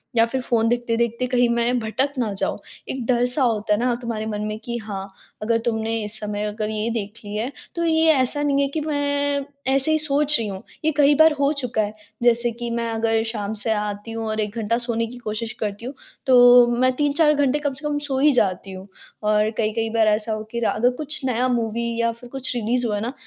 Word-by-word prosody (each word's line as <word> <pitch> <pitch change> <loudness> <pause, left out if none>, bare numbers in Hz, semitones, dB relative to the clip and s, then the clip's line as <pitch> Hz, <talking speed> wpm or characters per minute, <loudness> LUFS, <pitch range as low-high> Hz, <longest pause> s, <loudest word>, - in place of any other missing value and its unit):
या 230 0 +5
फिर 260 +3 -3
फ़ोन 230 -2 +1
देखते-देखते 235 0 0
कहीं 245 -1 +3
मैं 235 +1 +1
भटक 240 +6 -1
ना 225 -4 0
जाऊँ। 195 - -2 0.3
एक 260 -3 -3
डर-सा 245 +3 +2
होता 215 -3 +1
है 210 - +1
न - - 0
तुम्हारे 230 -3 -3
मन 210 -1 -3
में 215 0 -3
कि 235 0 -3
हाँ, 200 -3 -6 0.3
अगर 230 +2 +2
तुमने 225 -1 -1
इस 210 +1 -4
समय 210 0 -3
अगर 210 0 -3
ये 215 +1 -2
देख 210 -3 -3
ली 205 0 -6
है 230 +5 -2 0.2
तो 340 - -1
ये 320 0 +3
ऐसा 275 +1 +1
नहीं 280 -1 +2
है 280 - +2
कि 310 +2 -3
मैं 285 -1 0 0.3
ऐसे 275 +3 +3
ही 315 - +4
सोच 300 0 +2
रही 225 - -2
हूँ। 195 0 -6 0.2
ये 315 - +4
कई 290 0 +5
बार 315 +1 +6
हो 280 0 +3
चुका 250 -6 -1
है 210 0 -2 0.3
जैसे 240 0 +3
कि 235 +1 -5
मैं 235 0 -2
अगर 225 0 +1
शाम 215 -2 -3
से 225 - 0
आती 210 +1 -3
हूँ 225 0 -4
और 215 0 -2
1 210 0 -2
घंटा 230 +1 0
सोने 235 -1 -1
की 245 +2 -10
कोशिश 220 0 -4
करती 205 +2 -5
हूँ 260 - -5 0.3
तो 245 -1 +8
मैं 255 0 +4
3-4 295 +2 +3
घंटे 285 -1 +1
कम 290 -2 -2
से 295 +3 -5
कम 295 0 -1
सो 270 -2 -1
ही 295 +2 +5
जाती 195 -4 0
हूँ। 190 +1 -9 0.4
और 210 0 +3
कई-कई 225 +1 0
बार 220 -1 +2
ऐसा 215 +1 +1
हो 215 0 -4
कि 235 - -2
रा 235 - +1
अगर 245 +3 +2
कुछ 300 0 -4
नया 250 0 +1
मूवी 235 -1 -1
या 230 0 +2
फिर 235 +1 -13
कुछ 260 -1 -4
रिलीज़ 240 +2 0
हुआ 210 - -1
है - - -3
न, 250 - -4
235 Hz, 235 wpm, -22 LUFS, 220-265 Hz, 0.4 s, तो